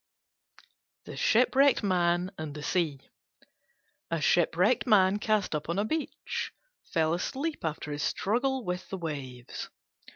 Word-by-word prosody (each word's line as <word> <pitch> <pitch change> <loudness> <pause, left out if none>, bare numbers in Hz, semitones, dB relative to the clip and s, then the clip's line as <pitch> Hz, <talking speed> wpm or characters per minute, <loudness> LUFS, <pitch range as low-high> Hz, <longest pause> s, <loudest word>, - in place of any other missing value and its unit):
THE - - -8
SHIPWRECKED 260 +3 +4
MAN 180 -1 +1
AND 155 -3 -6
THE 150 - -7
SEA 155 -5 0 1.1
A 165 - 0
Shipwrecked 180 - +3
Man 200 -2 +5
cast 215 -4 +1
up 150 +1 -3
on 170 - 0
the 205 +2 +1
beach 310 +4 -3 0.4
fell 160 -1 +2
asleep 280 - -3
after 155 -2 -3
his 145 0 -3
struggle 250 - 0
with 180 +1 -4
the 190 - -4
waves. 135 -7 -6
180 Hz, 130 wpm, -29 LUFS, 160-220 Hz, 1.1 s, Man